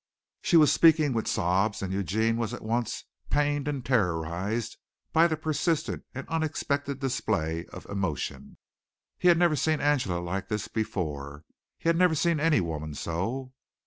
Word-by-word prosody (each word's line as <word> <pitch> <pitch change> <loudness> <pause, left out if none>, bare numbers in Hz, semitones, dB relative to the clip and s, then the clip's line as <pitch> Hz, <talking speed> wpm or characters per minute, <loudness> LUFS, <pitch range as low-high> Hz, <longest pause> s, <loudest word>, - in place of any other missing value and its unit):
She 170 - +4
was 150 -2 +6
speaking 155 -4 +5
with 115 -1 -1
sobs, 95 +5 +1
and 95 -1 -3
Eugene 110 +4 0
was 115 0 -2
at - - -11
once 115 +1 -2 0.3
pained 145 0 +1
and 140 -4 -3
terrorized 95 -1 -1 0.4
by 165 +1 +6
the 160 -2 -1
persistent 155 +1 -1
and 135 - -6
unexpected 145 -3 -1
display 90 - -1
of - - -10
emotion. 95 -9 -4 0.6
He 180 - +2
had 175 -1 +7
never 170 -2 +3
seen 155 +2 +1
Angela 130 -12 +1
like 95 +2 -3
this 105 -1 -2
before. 75 -9 -4 0.3
He - - -5
had 165 0 +4
never 180 -2 +4
seen 165 +1 +2
any 155 -4 +3
woman 80 -3 -4
so. 115 - -3
120 Hz, 155 wpm, -28 LUFS, 95-150 Hz, 0.6 s, had